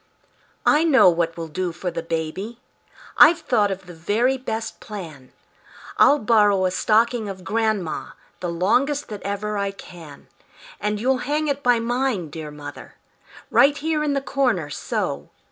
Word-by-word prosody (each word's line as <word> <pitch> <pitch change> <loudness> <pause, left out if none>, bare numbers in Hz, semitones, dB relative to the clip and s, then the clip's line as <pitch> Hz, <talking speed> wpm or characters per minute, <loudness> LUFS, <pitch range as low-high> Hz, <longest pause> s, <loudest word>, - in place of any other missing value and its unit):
I 300 +2 +4
know 265 - +6
what 165 -1 -1
will 165 -1 -5
do 180 +3 -3
for 175 +2 -4
the 165 0 -4
baby. 165 +8 -4 0.6
I've 320 +2 +8
thought 215 -8 +2
of 190 -1 -5
the 180 - -11
very 210 +11 +1
best 225 -3 -5
plan: 160 -11 -9 0.7
I'll 290 - +6
borrow 210 -5 +3
a 185 - +1
stocking 220 +3 +1
of 190 -1 -8
grandma, 215 -4 -2 0.3
The 175 - -3
longest 250 - +1
that 210 -2 -7
ever 205 +1 -3
I 200 0 0
can; 170 -6 -12 0.5
And 210 0 -2
you'll 255 +3 +1
hang 305 +1 0
it 285 0 -1
by 245 -3 +3
mine, 235 - -1
dear 155 -1 -7
mother, 145 -1 -10 0.6
Right 285 +1 +5
here 305 0 -1
in 295 -1 0
the 275 - 0
corner, 250 - 0
so! 70 - -3
205 Hz, 160 wpm, -22 LUFS, 170-255 Hz, 0.7 s, I've